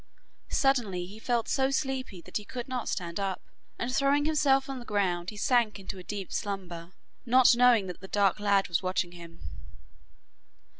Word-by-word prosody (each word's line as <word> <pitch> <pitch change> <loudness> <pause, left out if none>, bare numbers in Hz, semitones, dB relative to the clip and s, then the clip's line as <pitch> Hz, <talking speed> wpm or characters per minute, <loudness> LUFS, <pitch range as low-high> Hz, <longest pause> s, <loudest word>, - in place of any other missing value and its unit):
Suddenly 230 -10 +1
he 205 +4 -11
felt 235 0 0
so 265 -1 +2
sleepy 265 - -2
that - - -4
he 210 - -6
could 240 +3 -6
not 255 -2 -3
stand 170 0 -3
up, 195 -2 -2 0.4
and 245 +1 -3
throwing 280 +1 +3
himself 290 -3 +3
on 270 -1 -5
the - - -8
ground 185 -5 -1
he 210 - -9
sank 230 -2 +2
into 195 0 -7
a - - -9
deep 195 -1 -6
slumber, 180 -4 -5 0.3
not 250 0 +6
knowing 240 -4 +5
that 180 -1 -7
the 190 - -8
dark 200 -1 +2
lad 200 -1 +2
was 170 - 0
watching 185 -1 -1
him. 170 -1 -12
210 Hz, 180 wpm, -29 LUFS, 185-255 Hz, 0.4 s, not